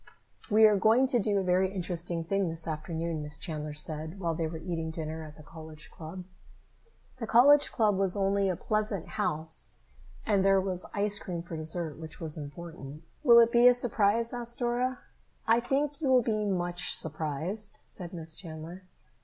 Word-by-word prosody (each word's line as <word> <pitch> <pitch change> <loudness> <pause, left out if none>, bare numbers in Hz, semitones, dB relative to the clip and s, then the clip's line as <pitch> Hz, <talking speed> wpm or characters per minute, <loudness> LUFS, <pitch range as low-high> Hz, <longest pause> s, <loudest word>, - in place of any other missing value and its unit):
"We 220 +1 +6
are 210 -1 +5
going 225 +7 +4
to 250 -2 +2
do 205 -1 +1
a 195 - +1
very 185 +1 +2
interesting 175 -2 -2
thing 195 +1 0
this 165 0 -6
afternoon," 160 +1 -3
Miss 150 0 -4
Chandler 150 -2 -4
said 155 +4 -4
while 170 -3 -1
they 160 0 -2
were 160 +1 -6
eating 165 -1 -4
dinner 160 0 -5
at 155 -1 -11
the 155 - -13
College 155 0 -11
Club. 170 +3 -8 1.0
The 225 - -4
Club 240 -4 +5
was 195 0 +1
only 195 0 +1
a 185 - 0
pleasant 210 -1 -2
house, 160 -7 -2 0.5
and 200 -3 +2
there 195 0 +4
was 185 -1 -3
ice 205 0 +2
cream 170 -2 -5
for 170 -1 -7
dessert, 160 0 -2
which 160 -1 -9
was 160 -3 -3
important. 150 -1 -9 0.2
"Will 240 -5 +7
it 230 0 +6
be 240 +1 +6
a 250 - +7
surprise?" 230 -1 +2
asked 240 -1 -4
Dora. 245 +1 -1 0.5
"I 225 +1 +4
think 280 +5 -1
you 290 - 0
will 255 -2 +5
be 215 -2 -1
much 175 -2 0
surprised," 160 +7 -2
said 175 -3 -9
Miss 165 -2 -5
Chandler. 165 +2 -9
180 Hz, 180 wpm, -29 LUFS, 160-215 Hz, 1.0 s, Will